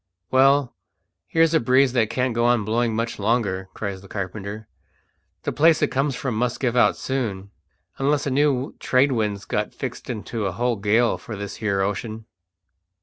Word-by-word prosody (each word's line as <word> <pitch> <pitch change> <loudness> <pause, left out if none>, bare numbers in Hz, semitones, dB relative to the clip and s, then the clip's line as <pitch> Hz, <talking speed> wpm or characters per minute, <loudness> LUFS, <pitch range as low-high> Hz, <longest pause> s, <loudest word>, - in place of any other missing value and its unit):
"Well, 135 0 +4 0.5
here's 165 0 +3
a 160 - +5
breeze 130 +2 +3
that 115 -4 +2
can't 125 +1 0
go 120 +1 +1
on 120 -3 +3
blowing 115 +1 0
much 115 0 -2
longer," 100 -3 0
cries 100 -3 -4
the 100 - -14
carpenter. 100 +2 -6 0.8
"The - - -1
place 160 +1 +4
it 150 - +2
comes 135 0 0
from 125 -1 -3
must 120 +2 -1
give 125 -3 0
out 125 - +4
soon, 105 -7 -3 0.5
unless 140 +1 +1
a 140 - -1
new 140 -1 +1
trade 135 +2 +3
wind's 105 -5 -1
got - - -2
fixed - - -6
into 110 -2 -3
a 95 - -3
whole 120 +3 0
gale 110 +4 +2
for 110 - -7
this 100 0 -6
here 100 -3 0
ocean." 110 +3 -3
120 Hz, 175 wpm, -23 LUFS, 105-130 Hz, 0.8 s, a